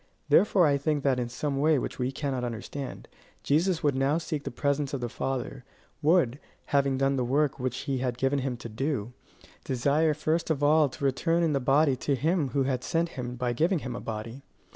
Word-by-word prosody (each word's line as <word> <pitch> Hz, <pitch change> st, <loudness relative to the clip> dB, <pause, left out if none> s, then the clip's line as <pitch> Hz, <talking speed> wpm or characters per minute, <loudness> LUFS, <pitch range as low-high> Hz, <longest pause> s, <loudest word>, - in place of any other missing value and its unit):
Therefore 195 Hz, -4 st, +5 dB
I 140 Hz, -2 st, +2 dB
think 145 Hz, 0 st, 0 dB
that 130 Hz, -3 st, +2 dB
in 120 Hz, -1 st, -2 dB
some 140 Hz, +3 st, -2 dB
way 155 Hz, +1 st, +4 dB
which -, -, -4 dB
we 125 Hz, +1 st, 0 dB
cannot 135 Hz, -3 st, -3 dB
understand, 120 Hz, +4 st, -6 dB, 0.4 s
Jesus 165 Hz, +4 st, +1 dB
would 145 Hz, -2 st, +3 dB
now 135 Hz, +3 st, +1 dB
seek 155 Hz, -3 st, -4 dB
the -, -, -2 dB
presence 140 Hz, -1 st, -1 dB
of -, -, -3 dB
the 120 Hz, -, -2 dB
Father; 130 Hz, +1 st, -4 dB, 0.4 s
would, 150 Hz, -5 st, +3 dB, 0.3 s
having 140 Hz, -1 st, +3 dB
done 135 Hz, 0 st, +1 dB
the 125 Hz, -, +1 dB
work 140 Hz, +3 st, +1 dB
which 125 Hz, -1 st, -2 dB
he 135 Hz, -3 st, -2 dB
had 125 Hz, -2 st, -2 dB
given 135 Hz, +2 st, +1 dB
him 130 Hz, -2 st, -2 dB
to 120 Hz, -, -8 dB
do, 125 Hz, -1 st, -2 dB, 0.5 s
desire 145 Hz, +5 st, +1 dB
first 160 Hz, +3 st, -1 dB
of 145 Hz, -3 st, 0 dB
all 150 Hz, 0 st, +5 dB
to 140 Hz, -, -5 dB
return 165 Hz, +6 st, +1 dB
in 160 Hz, -2 st, +2 dB
the 140 Hz, -, +1 dB
body 135 Hz, +2 st, +3 dB
to 140 Hz, +2 st, 0 dB
him 155 Hz, +2 st, +1 dB
who 140 Hz, +1 st, +1 dB
had 130 Hz, -1 st, -1 dB
sent 165 Hz, +3 st, 0 dB
him 125 Hz, -5 st, -5 dB
by 125 Hz, 0 st, -1 dB
giving 170 Hz, -, +2 dB
him 125 Hz, -1 st, -4 dB
a -, -, -6 dB
body. 115 Hz, +4 st, -6 dB
140 Hz, 210 wpm, -28 LUFS, 125-150 Hz, 0.5 s, Therefore